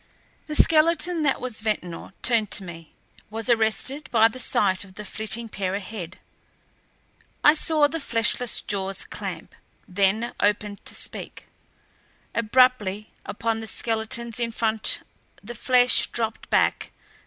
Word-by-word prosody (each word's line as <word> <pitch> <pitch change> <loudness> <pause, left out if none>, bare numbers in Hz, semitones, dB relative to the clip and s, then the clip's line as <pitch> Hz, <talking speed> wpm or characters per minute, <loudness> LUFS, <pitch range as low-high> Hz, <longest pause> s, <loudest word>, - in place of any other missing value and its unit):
The 305 - -4
skeleton 330 +2 +3
that 280 -3 +1
was 245 -4 -2
Ventnor 180 -6 -3
turned 225 -4 +2
to 195 - +2
me; 165 -3 -10 0.4
was 225 +3 -1
arrested 230 +6 +1
by 225 -1 +5
the 255 - -8
sight 190 -5 +2
of 190 -1 -15
the 210 - -8
flitting 220 +3 -4
pair 195 -3 -3
ahead. 195 -3 -7 1.3
I 295 - +8
saw 310 -1 +2
the 330 +3 -4
fleshless 235 -2 +1
jaws 195 -1 -3
clamp, - - -7 0.3
then 200 +4 +1
opened 205 0 0
to - - -2
speak. - - -4 0.9
Abruptly, 220 -3 +2 0.2
upon 225 +1 -2
the 220 - -7
skeletons 225 +1 -2
in 235 -1 -1
front 220 -1 +1 0.4
the 235 +4 -7
flesh 250 +1 +4
dropped 225 -2 -3
back. - - +1
225 Hz, 130 wpm, -24 LUFS, 205-245 Hz, 1.3 s, I